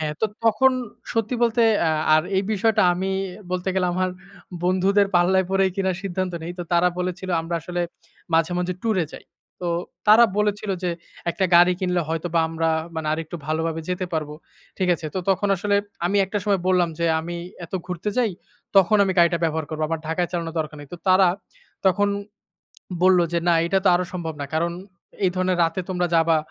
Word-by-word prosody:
হ্যাঁ। 150 -1 -2
তো 220 - +3 0.2
তখন 230 +4 +5 0.4
সত্যি 225 +2 0
বলতে 235 0 +2
এ - - +2 0.4
আর 155 - +4
এই 190 - +2
বিষয়টা 220 +2 +2
আমি 190 +2 -2 0.4
বলতে 185 +1 -2
গেলে 185 -1 +1
আমার 185 0 0 0.5
বন্ধুদের 195 +2 +3
পাল্লায় 185 +1 +3
পরে 195 0 +3
কিনার 190 -2 0
সিদ্ধান্ত 185 -1 -2
নেই। 170 +2 -5
তো 175 - -2
তারা 175 +1 +4
বলেছিল, 180 +1 -3
আমরা 165 +1 -4
আসলে 175 +2 -4 0.5
মাঝে, 165 +1 +2
মাঝে 180 0 -1
টুরে 210 -7 +1
যাই। - - -10 0.4
তো 175 - -3 0.4
তারা 225 +3 +8
বলেছিল 210 0 0
যে, 180 - 0 0.4
"একটা 190 - -1
গাড়ি 175 +1 +7
কিনলে 180 -1 +1
হয়তোবা 165 +1 0
আমরা 165 0 -1 0.3
মানে, 160 -1 -4
আরেকটু 160 +1 -4
ভালোভাবে 160 +1 -1
যেতে 180 0 -2
পারব।" 155 -2 -1 0.5
ঠিক 185 -2 +1
আছে? 165 -2 -7
তো 190 - 0
তখন 200 +2 +1
আসলে 200 +2 +1 0.3
আমি 200 +3 0
একটা 205 +2 -2
সময় 200 -3 +1
বললাম 180 -2 +3
যে, 170 - 0 0.2
"আমি 175 +1 -5 0.3
এত 170 - -15
ঘুরতে 180 +3 -3
যাই, 235 -4 +2 0.5
তখন 195 +3 +6
আমি 190 - 0
গাড়িটা 170 0 +4
ব্যবহার 160 -2 -1
করব। 155 - -5
আমার 165 -1 -2
ঢাকায় 175 +2 0
চালানোর 170 -1 -3
দরকার 155 -1 -3
নেই।" 145 - -11
তো - - -10
তারা 185 0 +6 0.6
তখন 200 +2 +3 0.9
বলল 185 0 +6
যে, 170 - +2
"না, 170 - +5
এটা 195 +2 +2
তো - - +5
আরো 180 +1 +1
সম্ভব 165 -3 -4
না। 140 - -3
কারণ 170 +2 0 0.5
এই 185 - +4
ধরণের 185 -1 +1
রাতে 165 +3 -1
তোমরা 180 -1 0
যাবা, 165 0 +4
180 Hz, 190 wpm, -23 LUFS, 165-195 Hz, 0.9 s, তারা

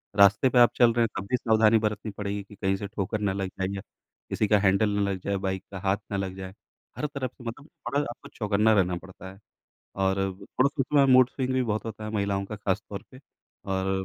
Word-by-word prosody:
रास्ते 100 +5 +6
पे 125 - +3
आप 120 -1 +7
चल 120 -2 +5
रहे 120 0 +3
हैं - - -3
तब 100 - -7
भी 125 - +4
सावधानी 110 -1 +4
बरतनी 105 0 -2
पड़ेगी 100 0 -3
कि 100 +1 -15
कहीं 95 0 0
से 100 0 -5
ठोकर 105 +1 -3
न 100 -2 +1
लग 95 - -2
जाए 95 - 0
या 100 - -5 0.5
किसी 105 - 0
का 105 0 +4
हैंडल 100 +2 +3
न 100 - +2
लग 95 -1 -2
जाए, 100 - -1
बाइक 95 0 -3
का 95 - -6
हाथ 95 +1 +1
न - - -1
लग 95 -1 -3
जाए। 95 0 -8 0.4
हर 150 - -2
तरफ़ 140 -4 -4
से 125 - -16
मतलब 120 +6 -7
टोटल 145 -3 -3
आपको 120 - -10
चौकन्ना 105 0 +2
रहना 90 -4 +2
पड़ता 95 +1 -11
है 95 - -16 0.6
और 95 0 +2 0.3
थोड़ा 130 +6 +1
उसमें 140 +1 +3
मूड 130 -1 +7
स्विंग 130 -1 -2
भी 130 0 +2
बहुत 110 -3 -2
होता 110 -1 -6
है 110 - -4
महिलाओं 100 -2 0
का 105 - -7
ख़ास 100 0 -1
तौर 100 - -5
पे। 130 - -14 0.4
और 95 0 -1
105 Hz, 240 wpm, -27 LUFS, 95-115 Hz, 0.6 s, आप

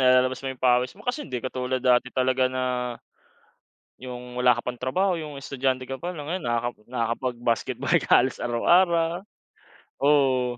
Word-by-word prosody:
nilalabas 130 0 +4
mo 135 - -3
yung 130 - -17
pawis 125 0 +3
mo 210 - -15
kasi 280 +4 -1
hindi 125 - -4
katulad 130 0 -2
dati 125 0 +3
talaga 130 0 +2
na, 130 0 -2 1.4
yung 125 -1 -8
wala 125 0 +5
ka - - -5
pang 125 -1 -4
trabaho, 180 +9 +1
yung 150 -3 -7
estudyante 130 -1 -2
ka 135 - -4
pa 175 +1 -4
lang, 150 -4 -7
ngayon 180 +3 -3
nakaka 120 0 0 0.2
nakakapag 120 +1 -2
basketball 120 -1 0
ka - - 0
halos 130 - -2
araw-araw. 170 +8 +2 0.8
Oo. 130 -4 +3
130 Hz, 165 wpm, -25 LUFS, 125-145 Hz, 1.4 s, wala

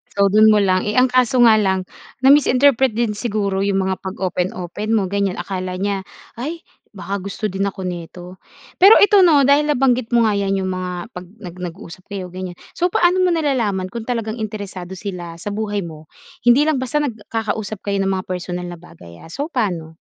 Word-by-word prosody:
So, 200 -1 +3
do'n 215 +1 +6
mo 210 - +4
lang, 185 0 +1
eh, 210 - -1
ang 255 0 +4
kaso 255 0 +3
nga 220 -2 +6
lang. 190 -2 +1 0.4
Na-misinterpret 265 -2 +4
din 235 -2 0
siguro 205 -4 -1
yung 195 -1 +1
mga 190 0 -2
pag-open-open 185 +2 -3
mo 195 -4 0
ganyan. 200 -2 0
Akala 185 -1 -4
niya, 195 0 -2 0.3
"Ay 320 +7 -5 0.3
baka 200 +1 -4
gusto 200 +3 -5
din 195 +1 -1
ako 195 -1 -6
nito." 180 +1 -7 0.4
Pero 390 +4 +9
ito 410 0 +6
'no, 310 -6 +5
dahil 285 +2 +4
nabanggit 255 -4 +2
mo 235 - +5
nga 215 - +2
yan 195 -1 0
yung 185 - -2
mga 180 -1 -5
pag 180 0 -8
nag 185 -3 -11
nag-usap 180 +1 -9
kayo, 190 -3 -6
ganyan. 185 -1 -6 0.2
So, 355 - +2
paano 355 +1 +2
mo 365 - +3
nalalaman 230 - -1
kung 230 0 -7
talagang 230 -2 -3
interesado 200 -4 -6
sila 175 -3 -7
sa 205 - -6
buhay 205 -1 -2
mo? 155 -2 -10 0.4
Hindi 240 +4 +6
lang 310 -4 +1
basta 280 +4 -1
nagkakausap 220 -4 -4
kayo 200 -1 -1
ng 195 - 0
mga 190 -1 -2
personal 180 -1 -4
na 175 -1 -9
bagay 125 - -15
ah. - - -12
So, 285 - -5
paano? 175 - -2
200 Hz, 190 wpm, -19 LUFS, 185-240 Hz, 0.4 s, Pero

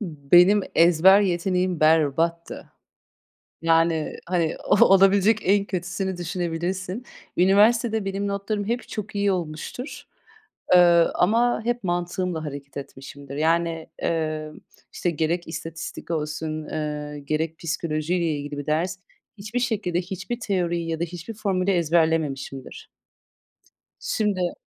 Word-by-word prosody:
Benim 175 +3 +4
ezber 175 +4 +6
yeteneğim 180 -2 0
berbattı. 160 +2 +1 0.9
Yani, 165 -1 +2
hani, 170 -3 0
olabilecek 195 +2 +5
en 200 +1 +3
kötüsünü 190 0 -3
düşünebilirsin. 180 +4 -3 0.3
Üniversitede 215 +4 +3
benim 195 +1 -2
notlarım 200 +1 -2
hep 235 +4 -3
çok 215 0 -6
iyi 200 -1 +1
olmuştur, 175 - -5 0.7
eee, 180 - +8 0.4
ama 230 +6 +2
hep 240 -1 -1
mantığımla 175 -1 -2
hareket 140 -1 -8
etmişimdir. 140 0 -9
Yani, 165 +1 0
eee, 155 -2 -2 0.4
işte, 175 - -1
gerek 170 +2 -1
istatistik 165 0 -7
olsun, 155 0 -3
eee, 150 -1 -4
gerek 155 +3 -2
psikolojiyle 165 +1 -1
ilgili 145 -2 -3
bir 145 - -5
ders, 170 +5 -1 0.4
hiçbir 215 +5 -4
şekilde 210 -8 -1
hiçbir 195 +6 -5
teoriyi 175 -6 -1
ya 160 -1 -2
da - - 0
hiçbir 175 +5 -7
formülü 195 -3 0
ezberlememişimdir. 160 -6 -1 1.1
Şimdi 190 -5 -1
175 Hz, 110 wpm, -24 LUFS, 160-195 Hz, 1.1 s, eee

